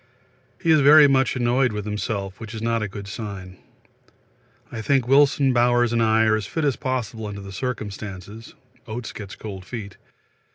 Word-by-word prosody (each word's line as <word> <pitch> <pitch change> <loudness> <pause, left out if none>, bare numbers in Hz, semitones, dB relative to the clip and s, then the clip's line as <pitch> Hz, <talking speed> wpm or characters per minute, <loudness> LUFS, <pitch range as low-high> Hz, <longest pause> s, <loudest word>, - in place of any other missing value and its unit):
He 165 - +1
is 155 - +6
very 145 +1 +8
much 135 -1 +2
annoyed 125 0 +2
with 105 -1 -5
himself, 100 -2 -4
which 110 0 -8
is 110 - -6
not 115 -1 0
a 105 - -1
good 100 0 -8
sign. 100 -4 -7 1.1
I 115 - -5
think 130 +1 +1
Wilson, 140 0 +4
Bowers 120 -1 +3
and 115 - +2
I 110 0 +3
are 110 -1 +3
as 105 -2 -3
fit 160 +6 -2
as 140 -4 +1
possible 120 -5 -3
under 100 -1 -7
the 100 0 -9
circumstances. 105 -2 -6 0.3
Oates 115 +2 -5
gets 100 -2 -9
cold 100 -4 -8
feet. 100 0 -8
110 Hz, 175 wpm, -23 LUFS, 105-125 Hz, 1.1 s, very